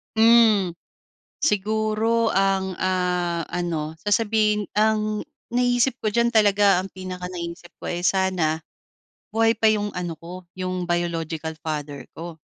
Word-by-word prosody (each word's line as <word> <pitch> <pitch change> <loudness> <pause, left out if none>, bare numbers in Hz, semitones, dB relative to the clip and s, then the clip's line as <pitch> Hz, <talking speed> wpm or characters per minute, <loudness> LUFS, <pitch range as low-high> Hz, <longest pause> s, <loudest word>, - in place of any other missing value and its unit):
Mm. 220 -4 +5 0.7
Siguro 220 0 +1
ang, 190 -1 +1
ah, 180 -2 0
ano, 160 -3 -3
sasabihin 210 0 +2
ang 215 0 +1 0.3
naisip 245 +1 +2
ko 215 - +1
diyan 235 +2 +2
talaga, 205 -3 +5
ang 190 - -9
pinakanaiisip 180 -2 -7
ko, - - -7
eh, 175 0 -3
sana 180 -5 +1 0.7
buhay 225 +1 +3
pa 220 0 +2
yung 210 -1 -1
ano 175 -2 -3
ko, 180 +2 -10
yung 185 -1 -3
biological 165 -2 -2
father 145 -2 -4
ko. 165 -1 -8
190 Hz, 120 wpm, -23 LUFS, 175-215 Hz, 0.7 s, Mm